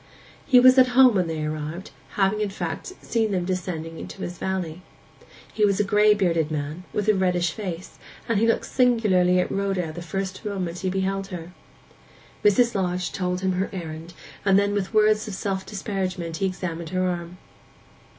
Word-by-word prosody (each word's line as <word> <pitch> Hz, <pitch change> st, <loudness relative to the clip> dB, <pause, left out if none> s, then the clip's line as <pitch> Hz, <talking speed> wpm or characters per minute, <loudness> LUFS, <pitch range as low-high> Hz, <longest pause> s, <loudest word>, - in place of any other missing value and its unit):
He 255 Hz, -3 st, +7 dB
was 255 Hz, +1 st, +7 dB
at 255 Hz, -, +7 dB
home 260 Hz, -2 st, +8 dB
when 185 Hz, -4 st, +1 dB
they 160 Hz, -1 st, -3 dB
arrived, 155 Hz, +5 st, -5 dB, 0.2 s
having 200 Hz, +2 st, +1 dB
in 210 Hz, -, 0 dB
fact 210 Hz, -, -5 dB
seen 225 Hz, -2 st, 0 dB
them 180 Hz, -2 st, 0 dB
descending 170 Hz, -3 st, -4 dB
into 195 Hz, -, -8 dB
his 175 Hz, -1 st, -6 dB
valley. 180 Hz, -3 st, -3 dB, 0.7 s
He 215 Hz, -, 0 dB
was 200 Hz, -1 st, +3 dB
a -, -, +4 dB
gray 210 Hz, +1 st, +4 dB
bearded 165 Hz, -6 st, +1 dB
man, 155 Hz, +3 st, -4 dB
with 210 Hz, -, -2 dB
a 215 Hz, -, +6 dB
reddish 180 Hz, -3 st, +1 dB
face, 185 Hz, -3 st, -7 dB, 0.3 s
and 230 Hz, -3 st, +1 dB
he 230 Hz, -, +3 dB
looked 230 Hz, -, +1 dB
singularly 210 Hz, -8 st, +3 dB
at 180 Hz, -, 0 dB
Rhoda 195 Hz, -5 st, -1 dB
the 175 Hz, -, -7 dB
first 190 Hz, +3 st, -4 dB
moment 185 Hz, -5 st, -3 dB
he 185 Hz, +1 st, -1 dB
beheld 195 Hz, +1 st, -1 dB
her. 175 Hz, -3 st, -7 dB, 0.9 s
Mrs. 235 Hz, +4 st, +4 dB
Lodge 180 Hz, -2 st, -1 dB
told 180 Hz, -1 st, -2 dB
him 190 Hz, 0 st, +1 dB
her 185 Hz, +2 st, -1 dB
errand; 165 Hz, -2 st, -7 dB, 0.3 s
and 195 Hz, -1 st, +4 dB
then 200 Hz, 0 st, +2 dB
with 200 Hz, -2 st, -2 dB
words 215 Hz, 0 st, +3 dB
of 205 Hz, -, -5 dB
self 190 Hz, -1 st, -3 dB
disparagement 185 Hz, -4 st, -3 dB
he 195 Hz, -, +1 dB
examined 170 Hz, -3 st, -4 dB
her 185 Hz, 0 st, 0 dB
arm. 175 Hz, 0 st, -4 dB
190 Hz, 180 wpm, -24 LUFS, 175-205 Hz, 0.9 s, home